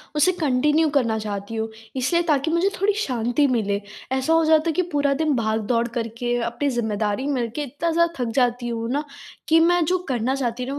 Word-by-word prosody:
उसे 300 +5 +4
कंटिन्यू 300 +2 +2
करना 230 -5 +2
चाहती 205 +1 -5
हूँ, 220 0 -2 0.3
इसीलिए 340 +7 +1
ताकि 300 0 +1
मुझे 340 +4 +2
थोड़ी 410 +1 +3
शांति 245 - +1
मिले। 210 -5 0 0.3
ऐसा 265 +4 +1
हो 325 0 +4
जाता 315 +1 +4
है - - +2
कि 365 - +1
पूरा 285 -1 +2
दिन 305 -3 +2
भागदौड़ 225 +1 0
करके 235 +1 -3
अपनी 240 +5 -1
ज़िम्मेदारी 220 0 -1
मिलके 255 0 -2
इतना 290 +5 -2
ज़्यादा 340 +1 +2
थक 230 - -2
जाती 245 -1 +1
हूँ 230 -1 -3
ना, 290 +3 0 0.4
कि 325 +1 +5
मैं 345 +1 +4
जो 365 +4 +2
करना 255 +1 0
चाहती 250 -2 -2
हूँ 260 - -4
255 Hz, 195 wpm, -23 LUFS, 230-310 Hz, 0.4 s, कि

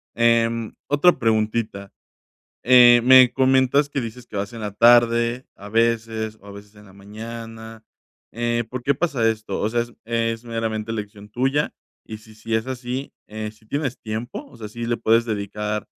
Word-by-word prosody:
Em, 115 -1 +1
otra 145 +2 +3
preguntita, 110 -3 -1 0.7
eh, 120 -1 +7
me 130 -1 +7
comentas 130 +2 +3
que 140 - -3
dices 120 +1 -8
que - - -9
vas 100 +3 -3
en 115 - -8
la 105 -1 -4
tarde, 120 +2 +4
a 100 +1 -11
veces, 110 -1 -1
o 100 - -18
a 100 - -10
veces 100 +1 -13
en 105 0 -16
la 95 - -17
mañana, 110 +2 -10 0.5
eh, 120 0 -1
¿por 130 -1 -5
qué 140 +2 +1
pasa 135 -7 0
esto? 110 -1 -3
O 105 - 0
sea, 120 +1 0
es 120 0 -11
es 115 0 -2
meramente 115 -1 -3
elección 105 -1 -7
tuya, 135 +6 -1 0.3
y 110 -1 -8
si 110 0 -17
sí 110 +1 -5
es 110 +2 0
así, 130 +1 -5 0.2
si 110 0 -8
tienes 140 0 -3
tiempo, 110 +3 -6
o - - -17
sea, 110 -2 -8
¿sí 115 +2 -6
le 120 0 0
puedes 115 +1 +2
dedicar 105 -1 -4
115 Hz, 175 wpm, -22 LUFS, 110-120 Hz, 0.7 s, eh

